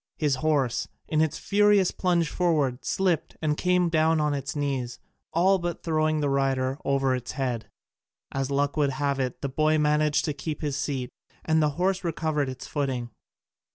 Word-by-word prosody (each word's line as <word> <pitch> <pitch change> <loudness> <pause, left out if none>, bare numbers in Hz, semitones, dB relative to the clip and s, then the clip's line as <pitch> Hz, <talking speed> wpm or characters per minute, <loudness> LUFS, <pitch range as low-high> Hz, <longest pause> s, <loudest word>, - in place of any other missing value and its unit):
His 145 -4 +1
horse, 140 -4 +1 0.2
in 155 -1 +1
its 160 -2 0
furious 205 -2 +3
plunge 175 -3 +1
forward, 150 -8 0
slipped, 180 -5 0
and 150 -1 0
came 180 +1 +2
down 160 -1 +2
on 150 -1 +1
its 140 +1 -4
knees, 135 -5 -2 0.3
all 190 +3 +3
but 175 -1 -4
throwing 155 -1 +1
the 145 - +1
rider 135 0 0
over 135 -1 +1
its 125 -2 -4
head. 125 -5 -3 0.6
As 135 0 -2
luck 140 +1 0
would 145 -2 +2
have 140 0 -1
it 130 0 -3
the - - +1
boy 155 +3 +2
managed 150 0 +2
to 150 - -1
keep 150 +1 -5
his 145 -2 -1
seat, 135 -3 -3 0.3
and 160 0 +3
the 150 - +3
horse 185 +1 +1
recovered 155 -4 -1
its 130 0 -7
footing. 130 -5 -2
150 Hz, 175 wpm, -26 LUFS, 135-160 Hz, 0.6 s, furious